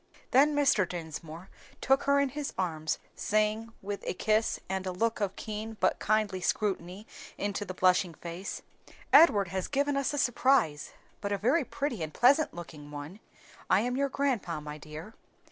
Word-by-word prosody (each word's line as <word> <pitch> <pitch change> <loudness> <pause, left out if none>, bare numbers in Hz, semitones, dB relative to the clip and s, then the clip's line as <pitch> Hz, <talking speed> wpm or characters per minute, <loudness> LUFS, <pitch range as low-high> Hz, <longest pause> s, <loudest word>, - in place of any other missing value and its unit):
Then 290 +3 +5
Mr. 270 -11 +3
Dinsmore 165 0 -7 0.3
took 270 +1 +2
her 280 0 +4
in 280 -1 +2
his 290 +1 -5
arms, 160 -4 -1 0.2
saying, 215 +2 0
with 200 +1 -5
a - - -1
kiss 215 +3 +1
and 190 0 -3
a - - -1
look 225 +5 -1
of 195 -2 -1
keen 215 0 -6
but - - +2
kindly 210 -3 +1
scrutiny 195 0 -1 0.3
into 205 0 -2
the 185 - -6
blushing 180 -2 +3
face, 175 +3 -6 0.5
"Edward 205 - +7
has 190 0 -2
given 285 0 0
us 275 -1 0
a 290 - -3
surprise, 245 - +2 0.3
but 200 - -3
a 200 - +1
very 255 - +2
pretty 275 - -3
and 155 -1 -5
pleasant 280 +5 +4
looking 155 -4 -10
one. 150 +7 -8 0.5
I - - +5
am 245 +1 -1
your 280 +1 +1
grandpa, 250 - -1
my 150 0 -8
dear." 155 +8 -9
205 Hz, 170 wpm, -30 LUFS, 175-255 Hz, 0.5 s, Edward